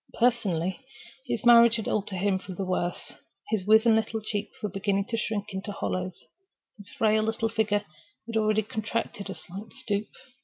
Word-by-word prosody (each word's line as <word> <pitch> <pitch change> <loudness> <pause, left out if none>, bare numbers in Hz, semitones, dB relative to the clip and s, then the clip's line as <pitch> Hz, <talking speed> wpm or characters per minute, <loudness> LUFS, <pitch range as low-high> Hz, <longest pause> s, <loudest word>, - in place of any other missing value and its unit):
Personally, 195 -7 +1 0.5
his 235 -2 -2
marriage 235 -1 +8
had 220 -3 -3
altered 205 -2 -1
him 190 +1 +1
for 190 - -8
the 195 - -3
worse. 180 -1 -2 0.4
His 210 -4 0
wizen 220 +1 +6
little 220 0 0
cheeks 210 -1 -5
were - - +1
beginning 195 0 0
to 230 - -1
shrink 215 -2 -2
into 190 +2 -4
hollows, 185 -2 -3 0.5
his 205 -2 -12
frail 215 -1 +2
little 225 +1 0
figure 210 -2 +1 0.4
had 230 0 -6
already 215 0 +3
contracted 215 -1 -3
a 195 - -4
slight 190 +6 -10
stoop. 205 -1 -2
210 Hz, 165 wpm, -27 LUFS, 195-220 Hz, 0.5 s, marriage